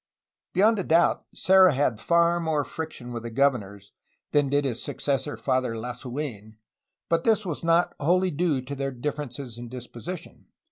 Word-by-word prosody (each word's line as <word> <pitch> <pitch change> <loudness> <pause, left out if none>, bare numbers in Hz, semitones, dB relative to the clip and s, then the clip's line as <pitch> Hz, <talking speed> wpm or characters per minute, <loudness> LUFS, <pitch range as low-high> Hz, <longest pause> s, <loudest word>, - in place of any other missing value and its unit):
Beyond 210 +3 +4
a - - -1
doubt, 170 +1 +3
Serra 185 -4 +5
had 130 -5 +1
far 170 0 +3
more 160 -3 0
friction 140 -6 -6
with 115 - -4
the 115 - -6
governors 110 -6 0 0.4
than 145 -2 +3
did 145 +1 +2
his 120 -4 -2
successor 140 +1 -2
Father 130 -3 0
Lasu^n, 120 -2 -6 0.5
but 165 0 +1
this 220 -2 +2
was 170 -3 -4
not 170 +1 +3
wholly 180 +5 +2
due 150 -4 0
to 135 +2 -6
their 135 0 -2
difference 135 0 -4
in 120 -3 -8
disposition. 130 +8 -8
140 Hz, 155 wpm, -26 LUFS, 125-170 Hz, 0.5 s, Serra